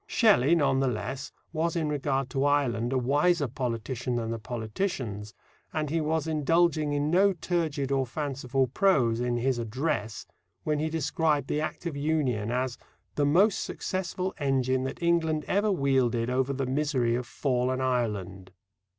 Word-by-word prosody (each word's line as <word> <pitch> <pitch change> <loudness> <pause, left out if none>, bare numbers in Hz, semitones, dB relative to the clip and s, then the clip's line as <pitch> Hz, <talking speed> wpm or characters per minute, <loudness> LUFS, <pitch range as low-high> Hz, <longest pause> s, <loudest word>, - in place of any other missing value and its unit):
Shelley, 185 - +4
none 135 -4 +2
the 135 - +2
less, 130 +4 -4 0.2
was 165 +1 0
in 160 -2 0
regard 135 -2 -1
to 135 - 0
Ireland 130 -5 +1
a 135 - +1
wiser 145 +5 +2
politician 125 0 -3
than 115 -1 -2
the 115 - -3
politicians, 110 - -4 0.4
and 155 -2 -2
he 165 0 +1
was 155 0 0
indulging 160 0 +2
in 145 +1 0
no 195 +3 +4
turgid 160 -5 -2
or 135 -1 +1
fanciful 135 -1 -1
prose 130 - +2
in 120 0 0
his 125 0 0
Address 115 -2 -2 0.4
when 150 -1 0
he 155 +1 0
described 155 -2 0
the 150 - 0
Act 155 - -4
of 165 -4 -3
Union 140 -8 0
as 125 +1 -2 0.3
"the 145 -1 +1
most 190 +8 +4
successful 185 0 -3
engine 130 -2 +1
that 135 - -5
England 160 -2 +1
ever 205 +2 +2
wielded 130 -7 +1
over 130 +1 +1
the 135 0 -2
misery 130 -3 0
of 120 0 -2
fallen 130 0 0
Ireland." 105 -8 -2
135 Hz, 160 wpm, -28 LUFS, 125-155 Hz, 0.4 s, Shelley